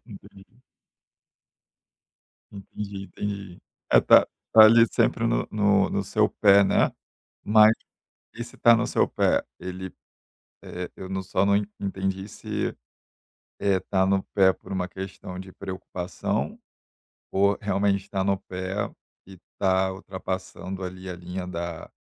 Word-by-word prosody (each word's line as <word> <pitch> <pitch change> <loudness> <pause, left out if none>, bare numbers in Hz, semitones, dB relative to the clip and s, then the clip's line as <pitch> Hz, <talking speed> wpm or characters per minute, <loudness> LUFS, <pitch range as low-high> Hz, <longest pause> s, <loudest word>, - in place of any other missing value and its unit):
entendi. 100 +2 -15 1.9
Entendi, 100 0 -7
entendi, 100 -3 -6 0.3
é, - - +7
tá - - +6 0.3
tá 110 - +9
ali 115 +1 +7
sempre - - +1
no - - 0
no 105 -2 +2
no 100 - -1
seu 105 +2 +2
pé, 100 -1 +5
né, 95 - +2 0.5
mas 110 +1 +6 0.6
esse 120 +1 -8
tá 120 0 +6
no 115 - 0
seu - - +2
pé, - - +1 0.2
ele, 95 0 -6 0.7
é, 90 0 -6
eu 95 - -8
não 95 0 -3
só 95 +1 0
não 100 0 +3 0.2
entendi 95 0 -3
se, - - -4 0.8
eh, 100 -2 +2
tá 95 0 +1
no 95 0 +1
pé 95 -2 +5
por - - -14
uma 90 -1 -2
questão 95 0 -8
de 95 0 -9
preocupação 95 -1 -4 0.7
ou, 100 +1 +2
realmente, 100 -1 0
tá 95 -1 -1
no 100 0 +2
pé 95 +1 -4 0.4
e 95 -1 -13 0.2
tá 95 -1 +2
ultrapassando 95 0 -6
ali 95 +1 -7
a 90 - -4
linha 90 +1 -6
da 85 -2 -6
95 Hz, 135 wpm, -25 LUFS, 95-100 Hz, 1.9 s, tá